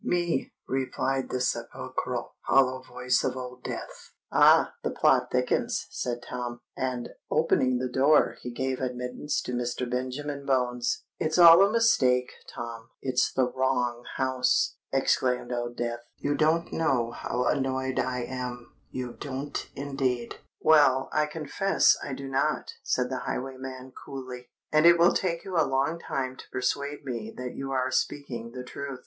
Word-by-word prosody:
"Me," 175 -5 0 0.2
replied 135 0 -1
the 130 - -2
sepulchral, 125 - -3
hollow 130 -1 +4
voice 125 0 0
of - - -1
Old 125 0 -7
Death. - - -7 0.2
"Ah! - - +6
the - - -1
plot - - +3
thickens," - - 0
said 120 -1 -3
Tom; 120 -1 -5 0.2
and, 125 -2 -2 0.2
opening 130 -5 +2
the 130 +1 -1
door, 135 +4 +4
he 125 - -5
gave 130 +2 -2
admittance 125 +3 -2
to 125 - -5
Mr. 120 +1 -2
Benjamin 130 +3 -3
Bones. 125 -3 0 0.2
"It's 155 +1 0
all 170 0 +10
a 200 - +3
mistake, 130 - +3 0.2
Tom—it's 120 +2 -2
the 130 -1 +2
wrong 125 -2 0
house!" 130 -1 +1 0.2
exclaimed 130 -2 +1
Old 120 0 -3
Death. 120 0 -2 0.2
"You 145 - -1
don't 160 +3 +1
know 125 -7 +1
how 125 +1 -2
annoyed 130 -1 0
I 125 0 -1
am—you 125 0 -6
don't 140 +1 -4
indeed!" 135 -4 -2 0.2
"Well—I 150 -1 +4
confess 160 +5 +2
I 140 - -4
do 135 +1 -6
not," 135 +3 0
said 125 0 0
the 130 - -2
highwayman 130 0 -5
coolly; 130 -2 -8 0.2
"and 155 +2 +6
it 170 0 +8
will 170 +1 +5
take 170 -3 -1
you 185 -3 -3
a - - +5
long 135 +5 0
time 130 -5 -3
to - - -12
persuade 140 +3 -2
me 115 -4 -4
that 125 -1 -5
you 135 0 -5
are 130 -1 0
speaking 120 -4 -2
the 125 - -6
truth. 135 +1 -6
130 Hz, 150 wpm, -27 LUFS, 125-140 Hz, 0.2 s, all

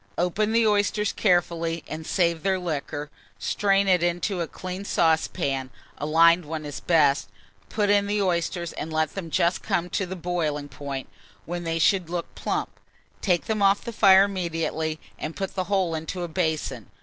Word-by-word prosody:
Open 195 +5 +1
the 230 0 +3
oysters 210 0 +2
carefully, 170 -4 +1
and 155 0 -6
save 170 -3 +1
their 190 0 +1
liquor; 150 -3 -4 0.3
strain 200 -1 +1
it 180 -2 +4
into 175 +2 0
a 165 - -2
clean 185 +3 -6
saucepan 160 -7 +1 0.3
(a 145 - -2
lined 170 +3 +5
one 155 0 -5
is 145 - -6
best), 150 -5 +3 0.4
put 205 -2 +1
in 200 0 +3
the 205 +1 0
oysters, 175 -2 -1
and 160 - -5
let 155 -1 0
them 185 -4 -5
just 170 +3 +1
come 175 +1 -1
to 195 - -1
the 190 - -5
boiling 160 -5 -2
point, 135 0 -6 0.4
when 175 +1 -4
they 165 0 -1
should 175 +1 +2
look 175 -1 -4
plump. - - -3 0.4
Take 180 -4 +1
them 215 -1 -1
off 195 0 +4
the 235 - -6
fire 195 -3 +7
immediately, 165 -4 -2 0.2
and 155 +1 -5
put 195 -1 -4
the 185 -1 -2
whole 190 -4 +1
into 160 +3 -4
a - - -2
basin. 155 - -2
175 Hz, 175 wpm, -25 LUFS, 160-195 Hz, 0.4 s, fire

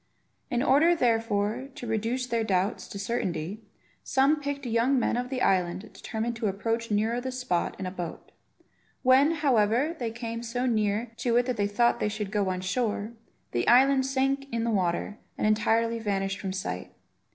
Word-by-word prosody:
In 245 -1 0
order, 320 +6 +5
therefore, 225 -2 0
to - - -7
reduce 225 +3 -1
their 235 -2 0
doubts 195 0 0
to - - -8
certainty, 195 -3 -3 0.4
some 280 +3 +2
picked 280 -1 -4
young 240 +3 +2
men 245 - +1
of 250 +1 -2
the 260 -1 -2
island 180 -1 +2
determined 225 +2 -3
to 225 - -1
approach 225 +4 -2
nearer 220 +3 +1
the 260 +1 -4
spot 250 -9 -1
in 190 - -3
a 185 - -3
boat. 175 -3 -7 0.7
When, 260 +3 +6
however, 275 -1 +2
they 235 -2 -1
came 230 0 -5
so 240 +2 -2
near 220 -1 0
to 235 -1 +1
it 245 - +3
that 250 -2 -2
they 205 -1 +1
thought 235 +4 +2
they 210 - 0
should 210 -2 -4
go 205 -3 +1
on 185 0 -2
shore, 210 +2 -1 0.4
the 120 0 -1
island 265 +2 +5
sank 270 +1 0
in 230 -1 -1
the 235 - 0
water 185 +1 -1 0.2
and - - -1
entirely 225 +2 +2
vanished 195 -2 -1
from 195 -2 -3
sight. 90 - -4
230 Hz, 180 wpm, -27 LUFS, 205-250 Hz, 0.7 s, When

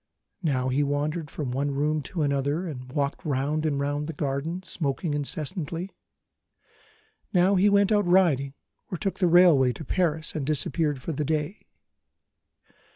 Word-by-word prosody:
Now 130 -6 0
he 135 +3 +1
wandered 145 +2 -1
from 140 -4 -4
one 140 +3 -1
room 150 +2 0
to 170 -5 -1
another, 140 +4 0
and 130 -6 -7
walked 140 -1 -2
round 150 +2 0
and 140 -2 -1
round 145 +1 -1
the 165 - -4
garden, 150 +5 -3
smoking 155 -2 -2
incessantly. 160 +4 -3 1.4
Now 185 +1 +4
he 195 +2 +4
went 200 +1 +3
out 205 -3 +3
riding, 150 -7 +3 0.4
or 180 - -2
took 195 +2 -3
the 180 - +3
railway 165 -8 +6
to 160 - -9
Paris 160 -1 0
and 155 - -3
disappeared 145 -1 0
for - - -3
the 150 0 -2
day. 155 +5 -2
150 Hz, 155 wpm, -26 LUFS, 140-175 Hz, 1.4 s, railway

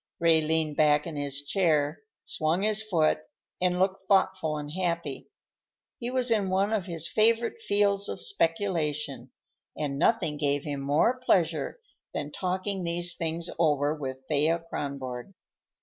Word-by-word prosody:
Ray 165 -1 +5
leaned 155 -1 +1
back 150 -1 +4
in 165 - -6
his 145 -1 -3
chair, 155 -3 +1 0.2
swung 165 +4 0
his 215 0 +2
foot, 170 -10 +2 0.4
and 180 -1 +2
looked 190 +1 +1
thoughtful 185 -5 +2
and 145 0 -6
happy. 170 -5 -3 0.7
He 240 - -3
was 255 -1 0
in 205 -4 +2
one 195 +3 +1
of 200 -4 -1
his 165 -2 -2
favorite 230 - +2
fields 200 - +2
of - - -4
speculation, 155 - -1 0.5
and 140 -2 -2
nothing 165 -5 +2
gave 145 -1 0
him 145 -2 -4
more 150 - +2
pleasure 165 - +1 0.4
than 145 - -3
talking 185 +2 -2
these 175 +1 0
things 165 0 -2
over 150 -2 +2
with 135 -3 -6
Thea 160 +3 +2
Kronborg. 135 +2 -5
165 Hz, 145 wpm, -28 LUFS, 150-195 Hz, 0.7 s, Ray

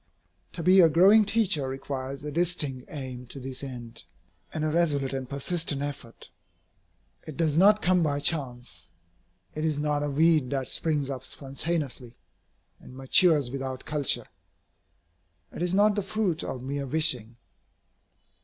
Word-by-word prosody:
To 165 - -5
be 185 +3 +6
a 165 - +6
growing 195 +7 +6
teacher 195 -11 +1
requires 135 +1 -5
a 150 - -5
distinct 150 -6 -1
aim 130 -4 -7
to 135 - -8
this 130 +1 -7
end, 120 -4 -8 0.5
and 155 0 -2
a 155 - 0
resolute 150 -5 +1
and 130 -2 -4
persistent 145 0 -2
effort. 140 -5 -7 1.0
It 155 - -8
does 160 -3 +1
not 205 +5 +5
come 180 0 +3
by 145 -3 0
chance. 125 - -3 0.6
It 155 - -4
is 155 -2 0
not 150 0 0
a 145 - -1
weed 155 -2 +3
that 135 -2 -2
springs 150 -4 -1
up 130 -2 -6
spontaneously, 135 -3 -4 0.6
and 130 - -13
matures 140 0 +3
without 130 -1 -5
culture. 150 -2 0 1.3
It - - -8
is 180 +1 0
not 205 +1 +4
the 205 - -1
fruit 195 -4 -2
of 125 - -5
mere 140 +1 -4
wishing. 130 -6 +1
145 Hz, 145 wpm, -27 LUFS, 130-165 Hz, 1.3 s, be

